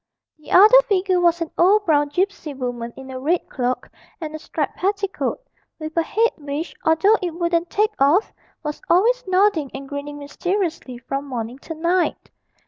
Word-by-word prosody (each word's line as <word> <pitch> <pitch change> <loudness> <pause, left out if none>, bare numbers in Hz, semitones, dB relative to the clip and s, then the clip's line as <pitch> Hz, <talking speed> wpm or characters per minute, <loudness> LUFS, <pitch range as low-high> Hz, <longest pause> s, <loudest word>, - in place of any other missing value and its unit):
The 305 - -15
other 435 +7 +8
figure 370 -2 +2
was 345 -1 +3
an 330 - -3
old 410 +4 +4
brown 295 -3 +3
gipsy 355 -2 -2
woman 245 -2 -4
in 265 0 -9
a 260 - -6
red 330 +6 0
cloak 250 -1 -2 0.3
and 310 -3 -6
a 310 - -6
striped 300 -2 -3
petticoat, 395 +1 -1 0.4
with 310 -1 -7
a 335 - +3
head 450 +7 +1
which, 295 +2 -5
although 325 +7 +4
it 350 -3 -3
wouldn't 340 0 0
take 425 +1 +1
off, 295 +10 +3 0.3
was 300 -1 -5
always 470 +8 +3
nodding 370 -6 +2
and 275 0 -7
grinning 285 +1 -6
mysteriously 325 -2 -3
from 275 +3 -4
morning 245 0 -5
to 325 - -8
night. 345 +3 0
330 Hz, 170 wpm, -21 LUFS, 285-375 Hz, 0.4 s, other